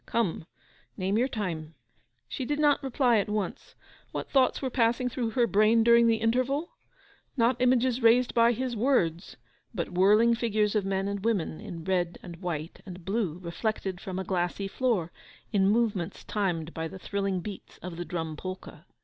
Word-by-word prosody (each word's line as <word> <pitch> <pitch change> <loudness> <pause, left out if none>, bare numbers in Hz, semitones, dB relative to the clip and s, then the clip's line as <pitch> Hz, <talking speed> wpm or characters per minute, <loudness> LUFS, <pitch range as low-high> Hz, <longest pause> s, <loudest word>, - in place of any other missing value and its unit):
Come, 190 -8 -1 0.5
name 195 +3 0
your 250 - +2
time.' 165 - -4 0.5
She - - -4
did 290 +3 -1
not 295 -1 +3
reply 255 -4 +2
at 200 - -2
once. 210 -1 -4 0.4
What - - -5
thoughts 265 -2 +3
were 260 -2 -3
passing 240 +1 +2
through 240 -1 -2
her 240 - +5
brain 215 +1 +4
during 235 0 +6
the 230 - +4
interval? 255 +8 0 0.7
Not 245 +1 +2
images 250 0 +3
raised 235 +2 +4
by 235 0 +5
his 250 +1 -3
words, 205 - 0 0.4
but 170 -3 -3
whirling 210 +6 +5
figures 215 -3 +1
of 210 -3 +1
men 195 0 -1
and 200 -1 -3
women 200 -9 0
in 175 -7 -7
red 175 -1 0
and 170 -2 -9
white 170 -3 -5
and 180 -3 -10
blue, 195 -5 -1
reflected 190 +1 -3
from 190 -3 -5
a 190 - -2
glassy 185 +1 -1
floor, 200 -7 0 0.4
in 195 -1 +4
movements 205 -5 0
timed 170 -6 -2
by 160 0 -3
the 175 - -9
thrilling 195 0 -2
beats 200 +2 -9
of 180 -1 -6
the 175 - -3
Drum 160 -3 -4
Polka. 185 -1 -7
210 Hz, 175 wpm, -28 LUFS, 180-235 Hz, 0.7 s, during